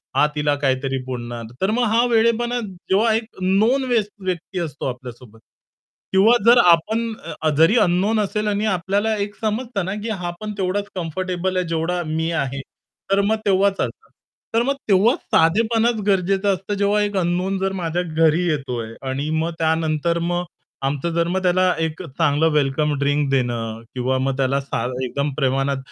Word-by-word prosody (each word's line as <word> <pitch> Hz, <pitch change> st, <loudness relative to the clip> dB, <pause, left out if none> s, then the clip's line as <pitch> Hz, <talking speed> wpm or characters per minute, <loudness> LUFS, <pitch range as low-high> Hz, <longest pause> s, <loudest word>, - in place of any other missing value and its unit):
हा -, -, +5 dB
तिला 150 Hz, -1 st, +1 dB
काहीतरी 135 Hz, 0 st, 0 dB
बोलणार. 120 Hz, -2 st, -5 dB, 0.2 s
तर 190 Hz, +2 st, +2 dB
मग 245 Hz, +3 st, +1 dB
हा 235 Hz, +1 st, +4 dB
वेडेपणा 235 Hz, +2 st, +2 dB
जेव्हा 200 Hz, +2 st, 0 dB
एक 225 Hz, -, 0 dB, 0.2 s
नोन 215 Hz, +9 st, +2 dB
व्यक्ती 195 Hz, -5 st, -2 dB
असतो 155 Hz, -5 st, -4 dB
आपल्यासोबत. 120 Hz, -3 st, -10 dB, 0.7 s
किंवा 215 Hz, +6 st, +6 dB
जर 240 Hz, +1 st, +7 dB
आपण 220 Hz, +7 st, +1 dB, 0.4 s
जरी 165 Hz, +9 st, +5 dB
अननोन 200 Hz, +4 st, +2 dB
असेल 210 Hz, +1 st, -2 dB
आणि 205 Hz, +1 st, 0 dB
आपल्याला 200 Hz, +3 st, 0 dB
एक 205 Hz, 0 st, -3 dB
समजत 225 Hz, +2 st, -2 dB
ना, 190 Hz, +2 st, -3 dB
की 230 Hz, -, -3 dB
हा 180 Hz, -5 st, -3 dB
पण 215 Hz, 0 st, -4 dB
तेवढाच 195 Hz, +1 st, -1 dB
कम्फर्टेबल 185 Hz, +1 st, -2 dB
आहे 180 Hz, -2 st, 0 dB
जेवढा 165 Hz, +2 st, -1 dB
मी 160 Hz, +2 st, -1 dB
आहे. 135 Hz, 0 st, -5 dB, 0.5 s
तर 200 Hz, 0 st, +4 dB
मग 215 Hz, +2 st, +1 dB
तेव्हाच 195 Hz, 0 st, +3 dB
चालतं. -, -, -4 dB, 0.5 s
तर 230 Hz, -, +4 dB
मग 275 Hz, +3 st, 0 dB
तेव्हाच 205 Hz, +6 st, +4 dB, 0.2 s
साधेपण 220 Hz, +8 st, +3 dB, 0.2 s
गरजेचं 195 Hz, +1 st, +2 dB
असतं 195 Hz, +2 st, -4 dB
जेव्हा 200 Hz, +1 st, +2 dB
एक 205 Hz, -1 st, -2 dB
अननोन 180 Hz, +2 st, 0 dB
जर 195 Hz, 0 st, -1 dB
माझ्या 165 Hz, +2 st, -1 dB
घरी 165 Hz, +1 st, +2 dB
येतोय 125 Hz, -7 st, -3 dB, 0.2 s
आणि 140 Hz, +3 st, -2 dB
मग 160 Hz, +2 st, 0 dB
त्यानंतर 160 Hz, +1 st, +1 dB
मग 175 Hz, +1 st, -1 dB, 0.4 s
आमचं 140 Hz, +4 st, -1 dB
जर 170 Hz, 0 st, +1 dB
मग 185 Hz, +2 st, -1 dB
त्याला 185 Hz, 0 st, +3 dB, 0.2 s
एक 160 Hz, +1 st, -2 dB
चांगलं 160 Hz, 0 st, +1 dB
वेलकम 150 Hz, 0 st, +1 dB
ड्रिंक 145 Hz, 0 st, +1 dB
देणं 115 Hz, -4 st, -1 dB
किंवा 130 Hz, +1 st, 0 dB
मग 135 Hz, 0 st, -1 dB
त्याला 135 Hz, +1 st, +1 dB
सा 135 Hz, -4 st, -3 dB, 0.2 s
एकदम 140 Hz, +3 st, -2 dB
प्रमाणात 135 Hz, 0 st, 0 dB
175 Hz, 160 wpm, -21 LUFS, 145-205 Hz, 0.7 s, जर